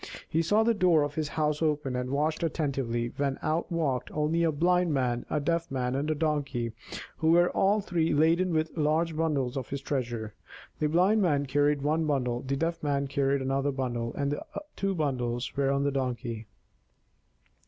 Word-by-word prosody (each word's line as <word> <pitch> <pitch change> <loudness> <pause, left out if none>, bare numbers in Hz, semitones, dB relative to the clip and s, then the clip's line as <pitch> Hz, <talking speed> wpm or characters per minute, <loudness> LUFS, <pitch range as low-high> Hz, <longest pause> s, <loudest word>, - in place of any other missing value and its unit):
He 165 - +1
saw 205 +7 +3
the 230 +1 +3
door 180 -7 +4
of 145 0 -3
his 155 0 -2
house 150 0 -1
open 150 -4 0
and 125 0 -2
watched 150 +3 0
attentively, 135 -8 -1
when 140 -1 0
out 160 +3 -1
walked 145 -7 -1
only 155 +2 0
a 165 -1 +3
Blind 175 +3 +2
Man, 125 -2 -1
a 150 - 0
Deaf 165 +3 -1
Man, 125 -2 -1
and 140 +3 -1
a 155 - +1
Donkey, 145 -6 -1 0.5
who 160 - +1
were 175 +1 +4
all 205 +2 +2
three 170 -4 0
laden 165 +5 +3
with 160 -1 -1
large 160 +1 +1
bundles 145 -6 0
of 130 -3 -4
his 140 - -3
treasure. 120 -6 -3 0.5
The 155 - +2
Blind 185 +7 +3
Man 145 -6 +2
carried 145 +1 +1
one 155 +2 +1
bundle, 125 -4 0
the 135 +1 -2
Deaf 165 +4 -2
Man 140 -2 0
carried 140 0 0
another 135 +2 0
bundle, 120 -3 -2
and 140 +1 -1 0.4
two 195 -1 -1
bundles 125 -6 -2
were 140 -1 +1
on 140 0 +1
the 140 - +1
Donkey. 120 -4 -3
145 Hz, 185 wpm, -28 LUFS, 135-160 Hz, 0.5 s, door